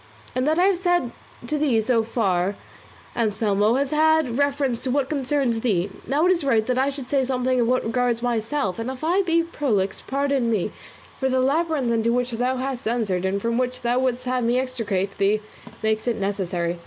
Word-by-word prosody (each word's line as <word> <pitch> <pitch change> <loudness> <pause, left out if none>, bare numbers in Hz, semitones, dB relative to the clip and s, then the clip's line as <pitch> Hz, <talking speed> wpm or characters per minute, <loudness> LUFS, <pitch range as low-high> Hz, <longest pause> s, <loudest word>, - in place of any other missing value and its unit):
"All 255 - +1
that 305 +4 +1
I 355 - +4
have 385 -1 +3
said 350 -8 +1 0.3
to 300 +5 -1
thee 270 -7 +2
so 230 +1 +2
far, 200 -4 0 0.6
Anselmo, 210 -1 +1
has 275 +1 0
had 310 -4 +3
reference 280 -4 0
to 260 - -2
what 270 +1 0
concerns 270 -5 0
thee; 200 -5 0 0.2
now 295 +5 +2
it 365 - +5
is 345 -4 +1
right 230 -6 +2
that 255 +1 0
I 270 +1 +2
should 275 -2 -7
say 275 0 +1
something 255 0 0
of 230 - +1
what 255 +1 +2
regards 235 +1 0
myself; 230 -3 -1
and 230 +2 -3
if 265 +2 -7
I 350 +5 +3
be 335 -3 +2
prolix, 230 - -1
pardon 275 -3 0
me, 215 -6 0 0.5
for 265 - +1
the 260 0 +1
labyrinth 285 -1 +1
into 230 0 +1
which 245 +1 0
thou 250 +3 0
hast 260 -2 -3
entered 210 -6 0
and 195 +1 0
from 230 +3 -1
which 255 0 -2
thou 240 +1 +2
wouldst 255 -1 -1
have 250 0 0
me 235 +2 +2
extricate 210 -7 -2
thee 200 +2 +3 0.4
makes 220 +1 0
it 240 - +1
necessary. 180 -4 -2
250 Hz, 205 wpm, -23 LUFS, 220-275 Hz, 0.6 s, it